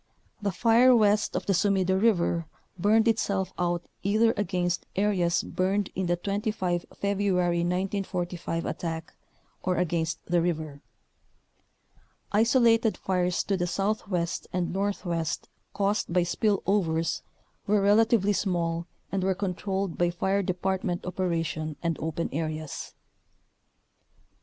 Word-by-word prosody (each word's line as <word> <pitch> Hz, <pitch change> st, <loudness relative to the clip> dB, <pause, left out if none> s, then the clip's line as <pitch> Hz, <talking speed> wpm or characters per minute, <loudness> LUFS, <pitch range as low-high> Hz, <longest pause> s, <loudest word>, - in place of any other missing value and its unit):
The 205 Hz, -1 st, 0 dB
fire 235 Hz, +6 st, +5 dB
west 210 Hz, -2 st, +3 dB
of -, -, -2 dB
the 200 Hz, -, +2 dB
Sumida 190 Hz, 0 st, +2 dB
River 175 Hz, -5 st, +2 dB, 0.3 s
burned 215 Hz, +5 st, +3 dB
itself 200 Hz, -4 st, 0 dB
out 175 Hz, -1 st, 0 dB, 0.2 s
either 215 Hz, +3 st, +3 dB
against 180 Hz, -3 st, -1 dB
areas 185 Hz, -4 st, +2 dB
burned 195 Hz, +2 st, -1 dB
in 185 Hz, -1 st, -2 dB
the 175 Hz, -, +2 dB
25 195 Hz, -2 st, -2 dB
February 190 Hz, -3 st, +1 dB
1945 180 Hz, -1 st, -2 dB
attack, 165 Hz, -1 st, -4 dB, 0.5 s
or 185 Hz, -, 0 dB
against 170 Hz, -2 st, 0 dB
the 175 Hz, -1 st, +2 dB
river. 155 Hz, -4 st, -2 dB, 1.5 s
Isolated 230 Hz, 0 st, +4 dB
fires 180 Hz, -1 st, 0 dB
to 200 Hz, -, 0 dB
the 175 Hz, -1 st, -1 dB
southwest 190 Hz, -3 st, -1 dB
and 180 Hz, -1 st, -1 dB
northwest 175 Hz, -4 st, -2 dB, 0.2 s
caused 200 Hz, -1 st, 0 dB
by 180 Hz, 0 st, +3 dB
spill 200 Hz, +3 st, 0 dB
overs 165 Hz, -5 st, +1 dB, 0.5 s
were 210 Hz, +1 st, +3 dB
relatively 205 Hz, 0 st, +4 dB
small 170 Hz, -4 st, -1 dB, 0.2 s
and 195 Hz, -1 st, -1 dB
were 190 Hz, 0 st, +1 dB
controlled 195 Hz, -1 st, -2 dB
by 175 Hz, 0 st, +3 dB
fire 190 Hz, +3 st, 0 dB
department 185 Hz, -1 st, -2 dB
operation 165 Hz, -4 st, -2 dB
and 170 Hz, -1 st, 0 dB
open 160 Hz, +1 st, -2 dB
areas. 155 Hz, -1 st, -4 dB
185 Hz, 120 wpm, -27 LUFS, 175-200 Hz, 1.5 s, fire